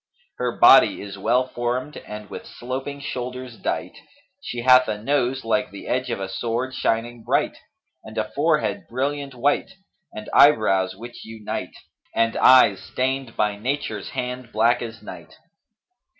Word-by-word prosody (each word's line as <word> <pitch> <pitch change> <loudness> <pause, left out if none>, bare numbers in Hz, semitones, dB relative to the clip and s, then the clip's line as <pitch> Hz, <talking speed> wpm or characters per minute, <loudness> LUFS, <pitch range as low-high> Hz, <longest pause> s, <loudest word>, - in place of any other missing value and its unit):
Her 125 -1 -2
body - - +7
is 100 -1 -8
well 125 +6 +2
formed 125 +4 -3
and 105 0 -9
with - - -9
sloping 135 +3 -6
shoulders 125 -2 -5
dight; - - -4 0.4
she 120 - -5
hath 130 0 +6
a 105 - -2
nose 130 +2 -1
like 125 +3 +1
the 100 - -10
edge 130 +1 -1
of - - -2
a 95 - -3
sword 120 +6 -3
shining 115 0 -1
bright - - 0 0.5
and - - -11
a - - -2
forehead - - 0
brilliant 140 +2 -3
white 145 +9 0 0.4
and 110 - -8
eyebrows 95 -9 +5
which 120 +4 -10
unite 110 -1 -6 0.4
and 115 0 +2
eyes 105 -7 +6
stained 130 -1 -3
by 105 -1 0
Nature's 135 +6 -3
hand 125 -2 -5
black 115 +3 +2
as 115 -1 -7
night. - - -11
120 Hz, 150 wpm, -23 LUFS, 110-130 Hz, 0.5 s, body